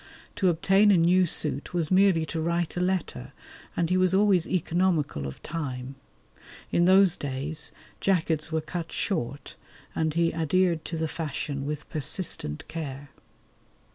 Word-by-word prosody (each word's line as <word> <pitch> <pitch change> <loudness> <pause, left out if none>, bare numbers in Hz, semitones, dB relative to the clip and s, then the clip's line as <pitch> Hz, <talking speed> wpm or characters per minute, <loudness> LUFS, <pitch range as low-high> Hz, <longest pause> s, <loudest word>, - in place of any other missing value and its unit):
To 190 - +3
obtain 195 +5 +4
a 200 - +6
new 180 +2 +4
suit 150 +1 -2
was 165 -2 0
merely 185 -4 +4
to 160 +1 -3
write 170 0 -1
a - - -1
letter, 180 -8 -2 0.4
and 170 0 0
he 185 - +3
was 185 0 +3
always 195 -4 +3
economical 165 - 0
of 65 - -9
time. 135 -5 -5 0.8
In 175 - +3
those 190 -1 +5
days 145 +3 -4 0.3
jackets 165 -5 0
were 160 0 0
cut 165 +1 -5
short, 140 - -3 0.4
and 160 -1 -1
he 170 0 +2
adhered 165 +1 +1
to 165 - -4
the 160 0 -1
fashion 145 -3 -4
with 150 0 -4
persistent 150 - -1
care. 140 -3 -6
165 Hz, 145 wpm, -27 LUFS, 150-180 Hz, 0.8 s, a